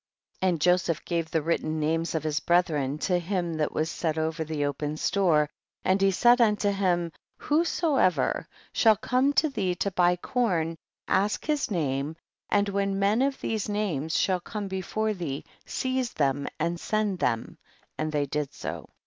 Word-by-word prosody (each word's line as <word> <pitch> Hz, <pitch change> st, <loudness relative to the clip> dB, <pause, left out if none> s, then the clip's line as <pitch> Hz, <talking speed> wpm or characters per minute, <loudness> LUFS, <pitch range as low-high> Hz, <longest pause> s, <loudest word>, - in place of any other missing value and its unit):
11. 185 Hz, -1 st, +3 dB
And 155 Hz, -, -8 dB
Joseph 180 Hz, -2 st, +2 dB
gave 165 Hz, -2 st, -1 dB
the 160 Hz, -2 st, 0 dB
written 155 Hz, -1 st, -1 dB
names 165 Hz, +2 st, 0 dB
of 160 Hz, -, -1 dB
his 155 Hz, -1 st, 0 dB
brethren 155 Hz, -6 st, +1 dB
to 180 Hz, +3 st, +1 dB
him 175 Hz, -1 st, -2 dB
that 150 Hz, -1 st, 0 dB
was 155 Hz, +1 st, -1 dB
set 160 Hz, -2 st, -2 dB
over 160 Hz, 0 st, -1 dB
thfi 155 Hz, -2 st, -2 dB
open 145 Hz, +2 st, -3 dB
store, 170 Hz, -5 st, +2 dB, 0.4 s
and 190 Hz, +1 st, +3 dB
he 195 Hz, -, +5 dB
said 240 Hz, +6 st, +5 dB
unto 210 Hz, -2 st, +3 dB
him, 175 Hz, -4 st, 0 dB, 0.3 s
whosoever 300 Hz, -, +1 dB, 0.3 s
shall 220 Hz, -2 st, +5 dB
come 255 Hz, +6 st, +1 dB
to 310 Hz, -, +3 dB
thee 195 Hz, -10 st, -1 dB
to 200 Hz, +3 st, -1 dB
buy 180 Hz, -1 st, +3 dB
corn, 175 Hz, -5 st, 0 dB, 0.3 s
ask 200 Hz, +2 st, +1 dB
his 300 Hz, -3 st, 0 dB
name, 145 Hz, -4 st, -1 dB, 0.3 s
and 205 Hz, 0 st, +2 dB
when 200 Hz, 0 st, 0 dB
men 200 Hz, +4 st, +2 dB
of 275 Hz, 0 st, 0 dB
these 220 Hz, -2 st, -2 dB
names 170 Hz, -8 st, -1 dB
shall 185 Hz, -2 st, +2 dB
come 205 Hz, +3 st, -5 dB
before 205 Hz, +3 st, -1 dB
thee, 160 Hz, -8 st, -4 dB, 0.2 s
seize 255 Hz, -2 st, -1 dB
them 140 Hz, -1 st, 0 dB
and 170 Hz, +2 st, -1 dB
send 210 Hz, -3 st, -1 dB
them, 115 Hz, 0 st, -1 dB, 0.4 s
and 155 Hz, 0 st, -2 dB
they 145 Hz, -1 st, +1 dB
did 145 Hz, 0 st, -2 dB
so. -, -, -6 dB
180 Hz, 170 wpm, -27 LUFS, 155-205 Hz, 0.4 s, he